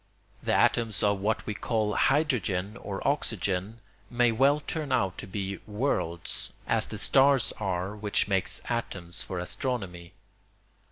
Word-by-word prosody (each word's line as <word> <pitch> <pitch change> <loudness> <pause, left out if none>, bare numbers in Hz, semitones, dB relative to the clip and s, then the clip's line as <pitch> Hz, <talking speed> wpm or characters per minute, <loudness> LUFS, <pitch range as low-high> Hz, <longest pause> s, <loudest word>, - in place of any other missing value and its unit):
The - - +1
atoms 110 -5 +2
of 100 -1 +3
what 105 +3 0
we 105 - -2
call 105 0 0
hydrogen 110 - +1
or 100 0 -4
oxygen 105 - -1 0.3
may 120 -1 +3
well 135 +6 +4
turn 150 -1 -4
out 95 -8 +2
to - - -6
be 100 0 -4
worlds, 105 -7 -2
as - - +2
the - - -6
stars 135 -2 +4
are 95 0 -2
which 105 -1 +1
make 95 -2 +1 0.2
atoms 95 -7 -3
for 95 - -4
astronomy. 90 -2 -3
105 Hz, 135 wpm, -28 LUFS, 95-125 Hz, 0.3 s, well